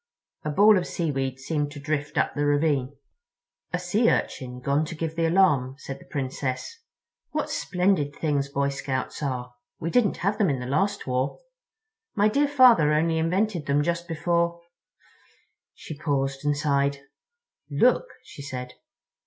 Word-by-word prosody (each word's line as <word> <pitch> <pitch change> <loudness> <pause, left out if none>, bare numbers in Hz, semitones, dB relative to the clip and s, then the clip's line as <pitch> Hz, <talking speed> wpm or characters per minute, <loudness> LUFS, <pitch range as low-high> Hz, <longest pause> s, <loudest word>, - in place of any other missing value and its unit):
A 150 - -2
ball 205 +6 +6
of 175 - -5
seaweed 135 -5 -2
seemed 145 +1 -2
to 145 - -8
drift 150 0 -3
up - - +1
the 145 - -1
ravine. 145 -2 +1 0.8
"A 180 - 0
Sea 200 +6 +2
Urchin 125 -1 -2
gone 140 +4 +1
to 165 - -7
give 160 0 -4
the 165 0 +1
alarm," 150 -8 +3
said 135 -2 -7
the - - -16
Princess; 135 - -4 0.5
"what - - -2
splendid 180 -6 0
things 145 -3 -1
Boy 140 0 0
Scouts 140 -1 -4
are. 125 -3 -3 0.3
We 165 - -3
didn't 240 -6 +2
have 200 +1 +1
them 200 -5 +3
in 135 -3 -1
the 125 - -5
last 195 +10 0
war. 130 +1 -1 0.8
My 210 0 +4
dear 285 +6 +2
father 250 - +6
only 160 +1 +2
invented 180 0 0
them 145 +1 +2
just 170 +1 -2
before—" 170 +1 0 1.2
She 155 - -8
paused 135 -2 -1
and 145 0 +1
sighed. 140 -1 +1 0.7
"Look," - - +3 0.2
she - - -11
said. 125 -2 -6
150 Hz, 155 wpm, -25 LUFS, 140-175 Hz, 1.2 s, ball